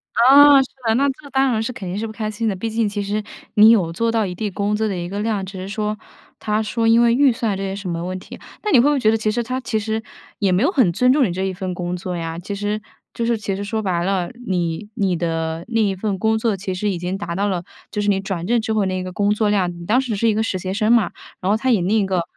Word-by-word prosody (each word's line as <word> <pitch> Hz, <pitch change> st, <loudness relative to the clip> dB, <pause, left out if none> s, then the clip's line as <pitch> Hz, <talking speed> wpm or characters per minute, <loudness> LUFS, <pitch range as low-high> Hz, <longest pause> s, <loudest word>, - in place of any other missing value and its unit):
啊， 275 Hz, +3 st, +8 dB
是 260 Hz, -, -5 dB, 0.2 s
的。 220 Hz, -, +3 dB
那 280 Hz, +3 st, +3 dB
这 280 Hz, +1 st, -6 dB
当 265 Hz, -1 st, +2 dB
然 220 Hz, -1 st, 0 dB
是 250 Hz, -, -3 dB
肯 190 Hz, -6 st, -7 dB
定 190 Hz, +3 st, -3 dB
是 225 Hz, -, -2 dB
不 220 Hz, -, -7 dB
开 215 Hz, -1 st, -3 dB
心 225 Hz, +2 st, -3 dB
的， 200 Hz, -, 0 dB
毕 225 Hz, +5 st, -4 dB
竟 225 Hz, -1 st, 0 dB
其 205 Hz, 0 st, -3 dB
实 210 Hz, +1 st, -2 dB, 0.3 s
你 215 Hz, +1 st, +8 dB
有 180 Hz, -8 st, +3 dB
做 230 Hz, +6 st, 0 dB
到 220 Hz, -3 st, +1 dB
一定 185 Hz, +4 st, -3 dB
工 205 Hz, +2 st, -1 dB
资 220 Hz, 0 st, 0 dB
的 190 Hz, -, -2 dB
一 175 Hz, 0 st, -4 dB
个 200 Hz, +2 st, -4 dB
量， 210 Hz, -3 st, -1 dB
只 190 Hz, 0 st, -8 dB
是 190 Hz, +1 st, -6 dB
说 210 Hz, 0 st, -2 dB, 0.4 s
他 215 Hz, +1 st, 0 dB
说 225 Hz, +1 st, -1 dB
因 230 Hz, +1 st, +5 dB
为 235 Hz, 0 st, +4 dB
预 275 Hz, -1 st, +5 dB
算 225 Hz, -5 st, -1 dB
这 195 Hz, -, -4 dB
些 195 Hz, 0 st, -3 dB
什 200 Hz, -2 st, -6 dB
么 170 Hz, 0 st, -3 dB
问 185 Hz, +1 st, -4 dB
题。 -, -, -11 dB, 0.2 s
那 425 Hz, -, -1 dB
你 255 Hz, -, +7 dB
会 240 Hz, -, +5 dB
不 -, -, +2 dB
会 275 Hz, -, 0 dB
觉 215 Hz, -2 st, +4 dB
得 225 Hz, -, +2 dB
其 215 Hz, -1 st, 0 dB
实 240 Hz, +2 st, -1 dB
他 255 Hz, +2 st, -3 dB
其 230 Hz, -3 st, -1 dB
实 220 Hz, +1 st, -2 dB, 0.4 s
也 195 Hz, -3 st, +1 dB
没 185 Hz, +6 st, +2 dB
有 330 Hz, -, +3 dB
很 240 Hz, -, +3 dB
尊 250 Hz, +7 st, +3 dB
重 280 Hz, -2 st, +4 dB
你 175 Hz, -, -2 dB
这 190 Hz, +2 st, -3 dB
一 190 Hz, -, -1 dB
份 185 Hz, -1 st, -4 dB
工 175 Hz, 0 st, -3 dB
作 180 Hz, 0 st, -5 dB
呀？ 165 Hz, 0 st, -4 dB
其 200 Hz, +3 st, -5 dB
实 205 Hz, +1 st, -2 dB, 0.3 s
就 235 Hz, -, -2 dB
是 235 Hz, 0 st, +1 dB
其 200 Hz, -2 st, -3 dB
实 200 Hz, -, -4 dB
说 220 Hz, +2 st, -2 dB
白 175 Hz, -4 st, 0 dB
了， 190 Hz, -2 st, -1 dB, 0.2 s
你 180 Hz, +2 st, -2 dB
你 195 Hz, -5 st, 0 dB
的 165 Hz, 0 st, -2 dB
那 225 Hz, -1 st, 0 dB
一 200 Hz, -2 st, +2 dB
份 195 Hz, -1 st, -2 dB
工 220 Hz, +2 st, +2 dB
作， 220 Hz, -2 st, 0 dB
其 190 Hz, 0 st, -4 dB
实 205 Hz, +2 st, -1 dB
已 180 Hz, -, -2 dB
经 180 Hz, +2 st, -3 dB
达 175 Hz, -4 st, -5 dB
到 200 Hz, +2 st, 0 dB
了， 180 Hz, -2 st, -2 dB, 0.3 s
就 210 Hz, -1 st, -2 dB
是 205 Hz, -, -1 dB
你 195 Hz, -, +1 dB
转 190 Hz, -3 st, -4 dB
正 235 Hz, +1 st, +2 dB
之 220 Hz, 0 st, -2 dB
后 210 Hz, -2 st, +2 dB
那 185 Hz, 0 st, -1 dB
一 -, -, -3 dB
个 185 Hz, 0 st, -6 dB
工 205 Hz, +2 st, +1 dB
作 210 Hz, 0 st, +1 dB
量， 195 Hz, -4 st, +1 dB
你 170 Hz, 0 st, -10 dB
当 230 Hz, +5 st, +3 dB
时 250 Hz, -4 st, -3 dB
是 225 Hz, +3 st, +1 dB
一 215 Hz, -, +2 dB
个 220 Hz, -, +1 dB
实习生 200 Hz, +2 st, 0 dB
嘛。 225 Hz, -6 st, +3 dB, 0.3 s
然 185 Hz, -, -1 dB
后 210 Hz, -, +4 dB
他 260 Hz, +4 st, 0 dB
以 220 Hz, -6 st, +3 dB
另 205 Hz, +5 st, +2 dB
一 200 Hz, -, +1 dB
个 185 Hz, -3 st, 0 dB
205 Hz, 335 characters per minute, -20 LUFS, 185-225 Hz, 0.4 s, 啊